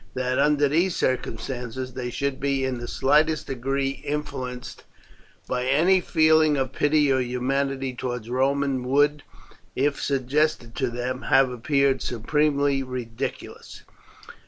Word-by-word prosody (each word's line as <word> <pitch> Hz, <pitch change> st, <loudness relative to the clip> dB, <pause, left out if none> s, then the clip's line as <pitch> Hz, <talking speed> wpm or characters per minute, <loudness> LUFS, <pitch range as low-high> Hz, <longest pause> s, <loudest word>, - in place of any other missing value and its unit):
That, 130 Hz, 0 st, -1 dB
under 150 Hz, -1 st, +3 dB
these 170 Hz, +5 st, +1 dB
circumstances, 125 Hz, 0 st, -3 dB
they 125 Hz, -1 st, -4 dB
should 140 Hz, +1 st, -2 dB
be 135 Hz, -1 st, 0 dB
in 130 Hz, -2 st, -2 dB
the 120 Hz, -, -6 dB
slightest 150 Hz, +5 st, +2 dB
degree 135 Hz, +1 st, -2 dB
influenced 130 Hz, -4 st, -5 dB, 0.6 s
by 125 Hz, 0 st, -2 dB
any 170 Hz, +8 st, +4 dB
feeling 155 Hz, -3 st, +3 dB
of 130 Hz, -1 st, -2 dB
pity 145 Hz, 0 st, +2 dB
or 130 Hz, -, +2 dB
humanity 135 Hz, +2 st, -1 dB
towards 125 Hz, -2 st, -5 dB
Romans 135 Hz, +1 st, 0 dB
would, 145 Hz, +2 st, +2 dB, 0.5 s
if 140 Hz, +2 st, 0 dB
suggested 140 Hz, -2 st, 0 dB
to 130 Hz, -2 st, 0 dB
them, 125 Hz, +2 st, -4 dB
have 135 Hz, -1 st, +4 dB
appeared 135 Hz, +1 st, +1 dB
supremely 140 Hz, +3 st, +1 dB
ridiculous. 125 Hz, -3 st, -6 dB
135 Hz, 125 wpm, -24 LUFS, 125-145 Hz, 0.6 s, any